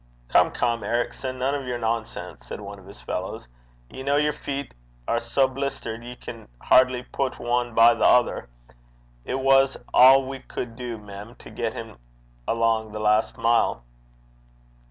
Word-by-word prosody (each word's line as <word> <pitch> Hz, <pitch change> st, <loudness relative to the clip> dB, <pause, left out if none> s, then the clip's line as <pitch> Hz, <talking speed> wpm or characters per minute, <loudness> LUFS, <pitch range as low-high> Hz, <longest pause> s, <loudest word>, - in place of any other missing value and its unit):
'Come, -, -, +5 dB
come, 115 Hz, -2 st, -1 dB
Ericson, 120 Hz, +4 st, -2 dB
none 130 Hz, +2 st, 0 dB
o' 145 Hz, -, -2 dB
your 125 Hz, -2 st, -3 dB
nonsense!' 115 Hz, -1 st, -4 dB
said -, -, -6 dB
one 100 Hz, -1 st, -9 dB
of 95 Hz, -, -16 dB
his 100 Hz, -, -12 dB
fellows. -, -, -5 dB, 0.4 s
'Ye 130 Hz, -, -9 dB
ken 140 Hz, +1 st, +2 dB
yer 150 Hz, 0 st, +2 dB
feet 140 Hz, -1 st, -5 dB, 0.3 s
are 115 Hz, -, +1 dB
sae 120 Hz, +4 st, +2 dB
blistered 130 Hz, -3 st, -4 dB
ye 125 Hz, +1 st, -8 dB
can 115 Hz, -2 st, -10 dB
hardly 130 Hz, -1 st, +4 dB
put 130 Hz, +1 st, -3 dB
ane 120 Hz, -1 st, -1 dB
by 115 Hz, +1 st, +7 dB
the 115 Hz, -, -2 dB
ither. 125 Hz, -, +3 dB, 0.8 s
It 130 Hz, -, -2 dB
was 135 Hz, 0 st, +4 dB, 0.2 s
a' 130 Hz, +2 st, +8 dB
we 135 Hz, 0 st, -6 dB
cud 120 Hz, -2 st, -6 dB
du, 120 Hz, -1 st, -5 dB
mem, 105 Hz, +2 st, -10 dB
to -, -, -13 dB
get 115 Hz, -2 st, -3 dB
him 115 Hz, -, -9 dB, 0.5 s
alang 115 Hz, -1 st, +1 dB
the 105 Hz, -, -5 dB
last 105 Hz, +1 st, +2 dB
mile.' 115 Hz, -, +2 dB
120 Hz, 165 wpm, -24 LUFS, 115-130 Hz, 0.8 s, a